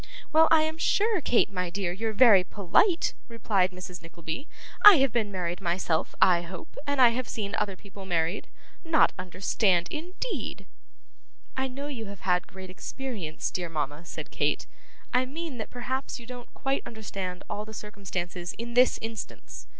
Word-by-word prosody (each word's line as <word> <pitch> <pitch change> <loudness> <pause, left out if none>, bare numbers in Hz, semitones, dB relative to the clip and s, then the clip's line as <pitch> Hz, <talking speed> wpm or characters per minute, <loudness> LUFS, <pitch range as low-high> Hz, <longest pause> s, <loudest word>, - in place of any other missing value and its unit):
'Well 320 +1 +7
I 320 -1 +6
am 315 +1 -2
sure, 420 +1 +2
Kate, 240 -6 +3
my 180 -2 -2
dear, 185 -1 -2
you're 220 +5 -2
very 215 -4 +7
polite!' 210 - +2
replied 210 -5 +1
Mrs 180 -1 -9
Nickleby. 165 - -6 0.4
'I 415 -2 +12
have 270 -2 +3
been 220 -3 0
married 180 -1 -3
myself 170 -2 0
I 175 -2 +5
hope, 175 0 -9
and 285 -1 0
I 250 -2 +9
have 240 +1 -2
seen 205 -2 -3
other 210 -3 -1
people 200 +1 -12
married. 170 +1 0 0.4
Not 325 -2 +4
understand, 185 0 +1
indeed!' 360 +10 -4 0.9
'I 265 0 0
know 270 +2 -6
you 250 -7 -5
have 200 -1 -9
had 180 -1 +1
great 190 -1 -10
experience, 200 -6 -5
dear 175 -2 -3
mama,' 150 0 -3
said 165 - -8
Kate; - - 0 0.5
'I 255 +1 +3
mean 300 -2 -6
that 220 - -5
perhaps 260 +2 -3
you 235 - -11
don't 245 0 -9
quite 270 0 -1
understand 195 -5 -5
all 210 - -3
the 215 - -10
circumstances 185 -4 -5
in 235 +1 -5
this 250 +1 +5
instance. 225 0 -7
210 Hz, 165 wpm, -28 LUFS, 180-255 Hz, 0.9 s, I